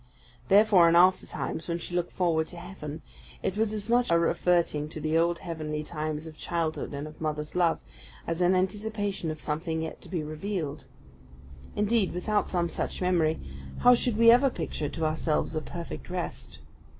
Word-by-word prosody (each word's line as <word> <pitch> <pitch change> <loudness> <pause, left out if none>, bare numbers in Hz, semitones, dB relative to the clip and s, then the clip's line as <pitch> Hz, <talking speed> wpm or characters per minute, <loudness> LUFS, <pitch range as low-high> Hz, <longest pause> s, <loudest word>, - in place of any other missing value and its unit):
Therefore, 195 -4 +6
in 165 - +3
after 185 +2 +5
times, 160 - -4
when 170 -1 -1
she 175 +1 -7
looked 175 -1 -1
forward 165 -3 +1
to 175 - -9
heaven, 170 -4 -8 0.4
it 190 - -1
was 215 0 +1
as 210 -1 -4
much 240 +1 +3
a 170 - +5
reverting 170 -3 +1
to 155 - -6
the 155 +1 -1
old 170 +1 +3
heavenly 155 -3 -4
times 155 -1 -4
of 160 -1 -9
childhood 165 -1 -2
and 150 +2 -7
mother's 150 -1 -3
love, 175 -2 +2 0.4
as 165 +1 -2
an 180 +1 +4
anticipation 205 -1 -1
of 155 0 -4
something 160 +1 -2
yet 160 - -6
to - - -13
be 175 -4 -2
revealed. 155 -1 -4 0.9
Indeed, 210 -1 +2
without 205 +4 0
some 175 -2 +1
such - - -4
memory, 170 -4 +2 0.4
how 245 0 +8
should 240 -2 +1
we 230 0 +8
ever 260 +3 +5
picture 150 - -3
to 165 - -3
ourselves 155 0 0
a 155 - 0
perfect 170 +3 -7
rest? 180 -1 -5
170 Hz, 175 wpm, -28 LUFS, 155-190 Hz, 0.9 s, how